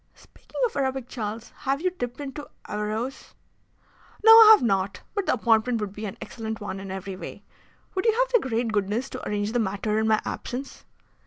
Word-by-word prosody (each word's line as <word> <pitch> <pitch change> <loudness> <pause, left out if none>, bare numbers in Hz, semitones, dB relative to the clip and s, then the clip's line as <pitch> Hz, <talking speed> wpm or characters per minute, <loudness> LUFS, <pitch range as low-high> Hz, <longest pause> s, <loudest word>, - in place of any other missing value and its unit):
"Speaking - - -13
of 470 - -3
Arabic, 265 -2 -1
Charles, 225 -1 -5
have 270 +1 -1
you 365 +3 0
dipped 245 -9 -5
into 290 +1 -7 0.2
Averroes?" 215 +5 -4 0.9
"No, 445 - +10
I 450 -1 +11
have 425 - +4
not. 195 -4 0
But 405 -2 -2
the - - +3
appointment 230 0 +2
would 205 -2 -4
be 210 +1 -5
an 195 - -8
excellent 220 -1 -6
one 205 -2 -5
in 195 0 -8
every 190 0 -5
way. 185 - -9 0.5
Would 380 +4 -1
you 445 - +5
have - - +1
the 465 - +2
great 230 0 0
goodness 210 +6 -1
to - - -6
arrange 205 0 -1
the 240 - 0
matter 210 +1 -1
in 220 - +1
my 215 -1 +4
absence?" 260 +3 -6
230 Hz, 195 wpm, -25 LUFS, 210-270 Hz, 0.9 s, I